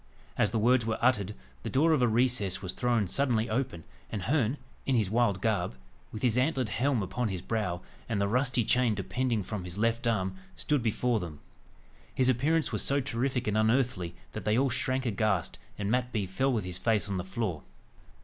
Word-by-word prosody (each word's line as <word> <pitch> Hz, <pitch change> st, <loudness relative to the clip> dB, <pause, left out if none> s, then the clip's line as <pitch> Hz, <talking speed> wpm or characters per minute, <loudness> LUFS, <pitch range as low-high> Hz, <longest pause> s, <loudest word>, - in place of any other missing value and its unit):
As -, -, +2 dB
the 115 Hz, -, -1 dB
words 120 Hz, +3 st, +4 dB
were 110 Hz, 0 st, -1 dB
uttered, 105 Hz, -5 st, +2 dB, 0.3 s
the -, -, -4 dB
door 155 Hz, +5 st, +3 dB
of 150 Hz, -, +2 dB
a 125 Hz, -, +5 dB
recess 115 Hz, -5 st, +1 dB
was 90 Hz, -, -2 dB
thrown 120 Hz, -5 st, +1 dB
suddenly 120 Hz, 0 st, +1 dB
open, 125 Hz, -8 st, -2 dB, 0.3 s
and 105 Hz, -4 st, -3 dB
Herne, 130 Hz, -, +1 dB, 0.3 s
in 135 Hz, -, +3 dB
his 105 Hz, -5 st, +1 dB
wild 110 Hz, -5 st, +2 dB
garb, 110 Hz, -, 0 dB, 0.4 s
with 110 Hz, -, -7 dB
his 125 Hz, -1 st, +3 dB
antlered 130 Hz, -3 st, +1 dB
helm 125 Hz, -1 st, +1 dB
upon 110 Hz, +6 st, -2 dB
his 95 Hz, -4 st, -4 dB
brow, 100 Hz, -6 st, -2 dB, 0.3 s
and 110 Hz, -3 st, 0 dB
the 100 Hz, -, +2 dB
rusty 125 Hz, +1 st, +2 dB
chain 125 Hz, -2 st, +3 dB
depending 110 Hz, +3 st, -1 dB
from 100 Hz, 0 st, -5 dB
his 90 Hz, +1 st, -7 dB
left 115 Hz, +2 st, +1 dB
arm, 105 Hz, -, 0 dB, 0.2 s
stood 150 Hz, -5 st, 0 dB
before 115 Hz, +1 st, +1 dB
them. 80 Hz, -6 st, -7 dB, 0.8 s
His 130 Hz, -1 st, +3 dB
appearance 145 Hz, +6 st, +2 dB
was -, -, +1 dB
so 140 Hz, +1 st, +3 dB
terrific 125 Hz, 0 st, -1 dB
and 105 Hz, -, 0 dB
unearthly 110 Hz, -5 st, +1 dB, 0.2 s
that -, -, -6 dB
they 105 Hz, +1 st, +2 dB
all 135 Hz, 0 st, +2 dB
shrank 130 Hz, +2 st, 0 dB
aghast, 105 Hz, -5 st, 0 dB, 0.2 s
and 100 Hz, 0 st, -2 dB
Mat 125 Hz, 0 st, +1 dB
Bee 105 Hz, -5 st, -1 dB
fell 130 Hz, +9 st, 0 dB
with 115 Hz, -5 st, 0 dB
his 90 Hz, 0 st, -4 dB
face 105 Hz, 0 st, +1 dB
on 100 Hz, -2 st, -2 dB
the 90 Hz, -, -2 dB
floor. 95 Hz, -5 st, -3 dB
115 Hz, 200 wpm, -29 LUFS, 100-125 Hz, 0.8 s, a